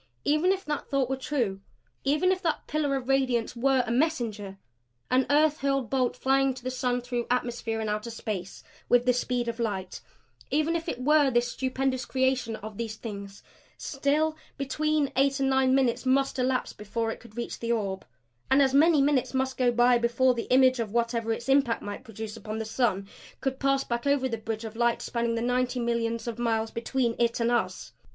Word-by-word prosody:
Even 305 +5 +3
if 385 0 -2
that 295 -1 -3
thought 270 -2 0
were - - +1
true 245 -8 -2 0.4
even 300 +7 +2
if 370 0 -1
that 325 -5 -1
pillar 295 -2 0
of 260 -2 -4
radiance 255 -4 +1
were 260 +1 +2
a 235 - -3
MESSENGER, 235 -8 -1 0.5
an 255 0 +3
earth 300 +1 +3
hurled 275 -4 0
bolt 255 -2 +1
flying 270 0 +2
to 255 - -11
the 255 - -2
sun 250 -1 -1
through 245 -1 -3
atmosphere 240 -2 -1
and 220 - -2
outer 210 +2 -2
space 210 -5 -5 0.3
with 245 0 +4
the 250 - +4
speed 245 -1 -1
of 235 0 -3
light, 195 -5 -3 0.5
even 310 +3 +1
if 330 -1 -2
it 245 - -4
were 295 0 +5
this 240 -1 +1
stupendous 260 0 -1
creation 260 -3 0
of 215 -1 -9
these 225 -2 -3
Things, 200 -3 -8 0.3
still 300 +3 0 0.2
between 295 +1 0
eight 275 +1 +2
and 270 0 +2
nine 265 0 +3
minutes 255 -3 +1
must 270 +1 +1
elapse 255 0 0
before 225 +2 -3
it - - -7
could 235 -1 -16
reach 240 - -4
the 235 0 -2
orb; 195 -4 -1 0.5
and 265 - +5
as 270 -1 +4
many 300 0 +5
minutes 275 -2 +1
must 265 0 0
go 250 -1 +2
by 240 +1 +4
before 240 +2 +3
the 235 -1 -5
image 255 0 +5
of 220 -3 -2
whatever 230 0 0
its 235 +2 -3
impact 270 -4 +2
might 205 +5 -6
produce 220 -2 -7
upon 215 0 -6
the 220 - -3
sun 220 -4 0 0.3
could 265 -1 -2
pass 275 0 +2
back 235 +3 -3
over 280 -2 +2
the 235 - -2
bridge 220 0 -4
of 220 0 -7
light 235 0 +2
spanning 235 -1 -1
the 230 - -1
ninety 250 +1 0
millions 230 -1 -1
of 235 0 -4
miles 225 -2 0
between 235 0 -1
it 235 0 +1
and 235 0 +1
us. 185 - -1
250 Hz, 200 wpm, -27 LUFS, 230-270 Hz, 0.5 s, were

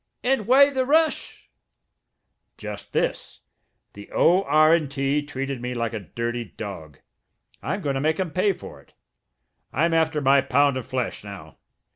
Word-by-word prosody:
"And 250 -5 0
why 280 +3 +6
the 260 -2 0
rush?" 315 +4 0 1.1
"Just - - -8
this: - - -2 0.5
The - - -12
O.R.& 165 -2 +4
T. 135 +1 -1
treated 135 -3 -5
me 125 0 -4
like 115 -1 -2
a 110 - -3
dirty 115 +5 -4
dog. 90 -11 -9 0.6
I'm - - -3
going 140 - -1
to 135 - -2
make 155 +3 0
'em 185 -4 -2
pay 185 +4 +2
for 75 - -12
it; - - -28 0.8
I'm 165 +4 +1
after 160 -1 +1
my 140 0 +4
pound 140 +1 +2
of 130 - -5
flesh 130 -5 -3
now! 95 -8 -11
140 Hz, 150 wpm, -24 LUFS, 120-170 Hz, 1.1 s, why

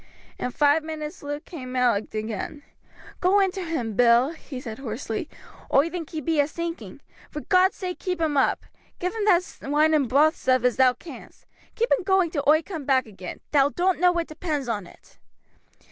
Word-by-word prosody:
In - - -2
five 290 +4 +3
minutes 315 +1 -6
Luke 290 +1 -5
came 255 -6 -8
out 250 -3 +3 0.2
again. 220 +6 -5 0.6
"Go 375 +3 +4
in 385 -1 +3
to 380 0 -5
him, 270 -10 -3
Bill," 240 +4 +5
he 310 -5 -9
said 230 -3 -7
hoarsely. 230 +2 -4 0.4
"Oi 295 +5 +3
think 340 -3 -5
he 315 -2 -5
be 315 +2 0
a 285 - +4
sinking. 335 +2 -6 0.3
For 300 - -6
God's 375 +1 +3
sake 365 -2 -5
keep 360 -2 -3
him 315 -3 0
up. 275 - +1 0.3
Give 360 +1 -2
him 440 -2 -2
that 365 -3 +4
wine 300 +3 +2
and 285 -6 +2
broath 300 +4 +4
stuff 255 -1 +1
as 250 -2 +2
thou 255 -1 +5
canst. 320 +7 -13 0.3
Keep 470 +2 0
him 460 - +3
going 380 -3 +2
till 290 - -1
oi 310 +2 +5
coom 325 -5 -6
back 265 -2 +2
again; 190 -4 -9
thou 285 -1 +4
doan't 360 +3 0
know 360 0 +5
what 340 -1 -1
depends 305 -4 -4
on 205 -6 -3
it." - - -20
300 Hz, 195 wpm, -25 LUFS, 255-345 Hz, 0.6 s, Bill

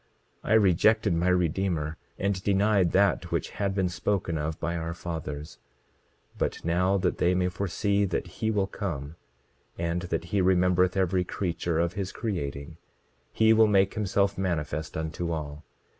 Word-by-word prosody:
27:30 - - -6
I - - +4
rejected 105 -1 +4
my 85 +2 +1
Redeemer, 85 -3 0 0.2
and 100 -1 -1
denied 100 -2 +3
that 95 -9 +2
which - - -1
had 100 -1 -2
been 95 -2 +1
spoken 90 0 -1
of 75 +1 -3
by 85 0 -2
our 85 0 -4
fathers; 80 -4 -6 0.8
but - - -2
now 90 +3 +2
that 95 - -1
they 90 +1 +3
may 90 0 +1
foresee 100 +2 0
that 95 - -2 0.2
he 110 - +1
will 105 -3 +1
come, 80 -7 -5 0.6
and 85 +1 -1
that 80 0 -1
he 100 - +3
remembereth 90 0 +3
every 95 -1 +2
creature 85 -2 -2
of 85 +1 +1
his 100 -1 -3
creating, 80 -7 -4 0.5
he 110 0 +4
will 110 0 +6
make 100 -2 +3
himself 100 -2 0
manifest 80 -5 -2
unto 80 +2 -3
all. 75 -2 -5
90 Hz, 160 wpm, -27 LUFS, 85-100 Hz, 0.8 s, will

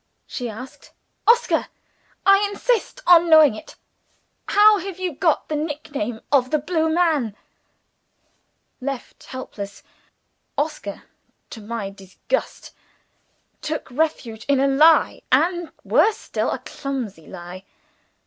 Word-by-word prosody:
she 245 -2 -5
asked. 255 +4 -11 0.3
"Oscar! 475 +1 +3 0.6
I 395 +1 +6
insist 485 +4 -1
on 345 -1 +6
knowing 315 -5 +7
it 215 - -11 0.7
how 420 0 +6
have 380 0 -6
you 370 -3 -3
got 320 +2 +1
the 310 - -2
nick 300 0 -4
name 235 -4 -3
of 260 -3 +3
'The 305 - +2
Blue 320 +1 0
Man'?" 315 - +1 1.5
Left 270 -1 -6
helpless, 205 -6 -8 0.7
Oscar 290 -9 -3 0.5
(to 225 - -8
my 210 -2 -5
disgust) 195 - -4 0.9
took 305 -3 -4
refuge 245 -6 -2
in 280 -1 +3
a 275 - +3
lie 305 +4 +4
and, 340 +5 +2
worse 445 0 +3
still, - - -2
a - - -1
clumsy 250 - -6
lie. 180 0 -9
290 Hz, 120 wpm, -22 LUFS, 235-340 Hz, 1.5 s, knowing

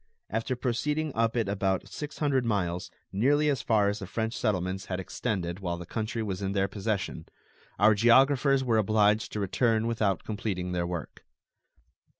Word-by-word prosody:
After 115 +3 -1
proceeding 145 +5 -1
up 115 +1 +1
it 115 -4 +1
about 95 -1 0
six 150 0 -7
hundred 140 -4 +1
miles, 90 -6 -1 0.2
nearly 145 +9 +3
as 135 -5 0
far 105 -3 +3
as 105 +1 -1
the 95 - -6
French 110 +3 -2
settlements 95 -4 -1
had 90 -1 -3
extended 90 -1 -3
while 85 -3 -3
the 85 - -7
country 110 +4 -3
was 100 -2 -4
in 100 0 -1
their 100 -1 +1
possession, 100 -5 -3 0.5
our 105 +3 +6
geographers 130 +5 +4
were 115 -3 +2
obliged 105 0 +2
to 105 - -2
return 110 +3 +1
without 110 -6 0
completing 100 -4 -3
their 85 -1 -1
work. 85 -3 -6
105 Hz, 165 wpm, -28 LUFS, 95-120 Hz, 0.5 s, our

